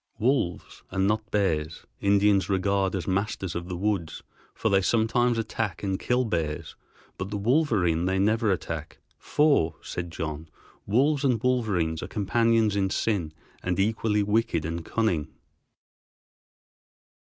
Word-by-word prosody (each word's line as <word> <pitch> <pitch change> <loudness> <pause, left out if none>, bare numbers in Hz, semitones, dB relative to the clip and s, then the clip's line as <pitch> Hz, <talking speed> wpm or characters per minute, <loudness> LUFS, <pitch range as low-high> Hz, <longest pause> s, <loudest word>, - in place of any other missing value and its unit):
Wolves, 115 -6 -1
and 95 0 0
not 105 +1 0
bears, 80 -7 -1
Indians 100 0 +3
regard 100 0 +1
as 95 - -4
masters 95 -2 -1
of 85 0 -4
the 90 - -3
woods, 95 -4 -2 0.3
for - - -1
they 95 -1 +4
sometimes 115 +4 +2
attack 110 -4 -3
and 95 -1 -1
kill 125 +1 +1
bears, 80 -7 -3 0.4
but 95 - -3
the 105 - -3
wolverine 100 - +2
they 95 +1 +1
never 110 +2 +2
attack, 80 -3 -4 0.2
"for," 140 - +2
said 90 -1 -5
John, 80 -1 -5 0.4
"wolves 140 +7 +2
and 125 -5 +2
wolverines 100 -11 +1
are - - -5
companions 115 +1 +2
in 95 -1 +1
sin 95 -6 -1 0.3
and 90 0 -1
equally 105 0 +1
wicked 105 -5 +1
and 85 +1 -3
cunning." 85 -6 0
100 Hz, 135 wpm, -26 LUFS, 85-110 Hz, 0.4 s, they